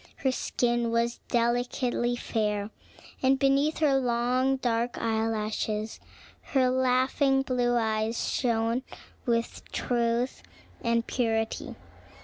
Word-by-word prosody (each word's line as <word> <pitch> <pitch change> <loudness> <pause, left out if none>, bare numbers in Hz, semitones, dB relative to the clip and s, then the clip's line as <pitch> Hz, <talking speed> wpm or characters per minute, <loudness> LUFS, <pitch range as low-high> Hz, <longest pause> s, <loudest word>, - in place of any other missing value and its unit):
Her 265 - 0
skin 240 -2 0
was 235 +1 0
delicately 245 +1 0
fair, 210 -3 -1 0.5
and 265 +1 +4
beneath 275 +3 +2
her 280 -4 +3
long 250 +2 +1
dark 240 -2 -1
eye 225 -1 0
lashes 215 0 -2 0.5
her 260 -2 +4
laughing 260 +1 +2
blue 245 -2 +1
eyes 220 0 0
shone 230 0 +1 0.5
with 230 -1 -1
truth 235 +1 0 0.4
and 235 -1 +1
purity. 225 -3 -1
240 Hz, 105 wpm, -28 LUFS, 230-255 Hz, 0.5 s, and